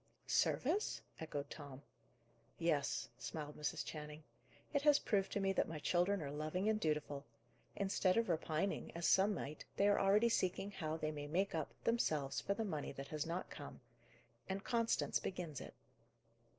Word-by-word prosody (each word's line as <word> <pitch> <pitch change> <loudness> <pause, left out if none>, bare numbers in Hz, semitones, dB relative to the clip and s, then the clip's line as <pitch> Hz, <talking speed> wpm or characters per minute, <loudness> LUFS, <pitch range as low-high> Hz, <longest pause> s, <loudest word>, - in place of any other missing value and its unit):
"Service?" 350 +11 +2 0.2
echoed 145 -3 -3
Tom. 140 -2 -8 0.7
"Yes," 160 -4 +1
smiled 150 +4 -5
Mrs. 150 - -2
Channing. 150 0 -6 0.5
"It 285 - +3
has 295 0 +7
proved 200 -7 +1
to - - +1
me 195 -1 +2
that - - +2
my 160 - -4
children 175 +4 +2
are 140 - -4
loving 155 +7 -1
and 215 0 +3
dutiful. 150 -4 -1 0.5
Instead 195 -1 +2
of 230 0 +3
repining, 165 +2 0
as 170 0 -2
some 195 +2 +5
might, 150 -2 -5
they 200 - +4
are 205 - +5
already 205 +4 +5
seeking 195 -2 +1
how 160 -5 -2
they 155 -1 -1
may 145 -1 -5
make 190 +6 +1
up, 160 -3 -1
themselves, 150 - +1
for 200 - 0
the 225 +1 -1
money 155 -7 -2
that 135 0 -7
has 155 0 -2
not 170 +2 -3
come. 145 - -8 0.7
And 195 +1 -2
Constance 230 -1 +2
begins 170 -6 -4
it." - - -9
170 Hz, 165 wpm, -39 LUFS, 150-200 Hz, 0.7 s, has